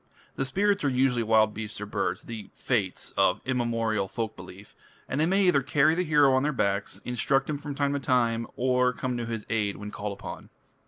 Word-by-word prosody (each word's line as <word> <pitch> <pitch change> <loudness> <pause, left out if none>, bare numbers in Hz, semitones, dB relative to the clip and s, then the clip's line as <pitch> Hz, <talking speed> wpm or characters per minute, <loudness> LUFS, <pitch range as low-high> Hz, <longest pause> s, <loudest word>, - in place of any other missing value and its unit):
The 135 - -1
spirits 200 +7 +1
are 140 - +3
usually 125 -2 +2
wild 110 -1 +3
beasts 105 -1 -6
or 105 - -4
birds 100 -1 -2
the 110 -4 -8
"fates" 105 -8 -2
of 95 -1 +3
immemorial 115 -5 0
folk 110 +3 -4
belief 90 +2 -12 0.3
and 140 - -1
they 160 - +3
may 195 +2 +3
either 175 -6 +4
carry 140 +3 +3
the 180 +2 0
hero 150 -4 +4
on 130 - +3
their 150 +2 +1
backs, 100 -7 -1
instruct 135 +3 +1
him 145 - -3
from 145 -1 -6
time 140 0 0
to 140 - -1
time, 115 -4 +1
or 125 0 +2
come 125 0 -3
to 120 -1 -3
his 115 -2 -4
aid 105 -3 0
when 105 0 -7
called 105 -1 -4
upon. 100 - -9
120 Hz, 210 wpm, -27 LUFS, 105-140 Hz, 0.3 s, either